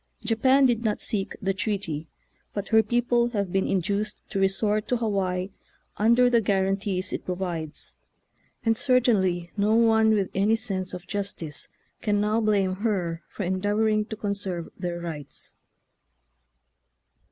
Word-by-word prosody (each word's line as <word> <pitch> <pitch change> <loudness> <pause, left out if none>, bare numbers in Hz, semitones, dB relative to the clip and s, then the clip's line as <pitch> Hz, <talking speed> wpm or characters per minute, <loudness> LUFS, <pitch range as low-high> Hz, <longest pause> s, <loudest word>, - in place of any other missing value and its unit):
Japan 260 +4 +4
did 240 -2 +2
not 215 -2 0
seek 205 -4 -1
the 195 0 +1
treaty, 185 -6 -3 0.5
but 205 -1 -3
her 220 -1 +6
people 240 +1 +2
have 200 -6 -2
been 195 0 +1
induced 200 +3 -1
to 195 - -1
resort 205 +2 +1
to 250 - +1
Hawaii 195 -4 -1 0.4
under 235 +4 +4
the 240 -2 +4
guarantees 195 -1 0
it - - -3
provides, 175 -4 -4 0.7
and 225 0 +3
certainly 215 -10 +2
no 210 +2 +3
one 225 -1 +5
with 195 -3 0
any 205 +3 +3
sense 195 -6 -4
of 180 +1 -9
justice 195 -6 -4 0.3
can 205 -2 +1
now 210 +2 +1
blame 200 -3 +1
her 185 -6 -1
for 205 - -5
endeavor 205 +4 +1
ing 215 0 +1
to 220 - -6
conserve 200 -5 -3
their 175 -2 -4
rights. 155 -5 -7
205 Hz, 140 wpm, -26 LUFS, 185-220 Hz, 0.7 s, her